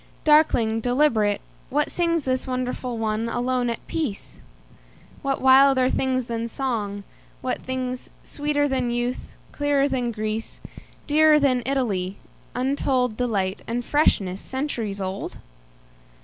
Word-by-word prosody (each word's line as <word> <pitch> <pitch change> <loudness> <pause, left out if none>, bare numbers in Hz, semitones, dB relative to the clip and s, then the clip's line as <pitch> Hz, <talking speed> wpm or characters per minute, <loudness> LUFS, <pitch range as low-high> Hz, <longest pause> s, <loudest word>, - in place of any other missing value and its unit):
Darkling, 300 -8 +4
deliberate, 235 -4 +2 0.3
what 295 +3 +1
singsThis 330 -7 0
wonderful 255 -1 -3
one, 220 +1 -1
alone, 245 +1 0
at 235 - -5
peace? 290 -12 -4 0.8
What 275 -2 -1
wilder 265 -1 +6
things 255 -1 0
than 230 -1 -3
song, 220 -5 -3 0.4
what 255 0 -3
thingsSweeter 260 +3 -2
than 260 -3 0
youth, 240 +1 -3 0.2
clearer 285 -1 +2
than 250 -3 -1
Greece, 215 0 -4 0.5
Dearer 305 0 +5
than 260 -4 +2
Italy, 205 -9 -1 0.4
untoldDelight, 250 -6 0
and 240 +1 -2
freshness 195 -10 +2
centuries 240 -7 -3
old? 190 0 -4
250 Hz, 105 wpm, -24 LUFS, 225-275 Hz, 0.8 s, wilder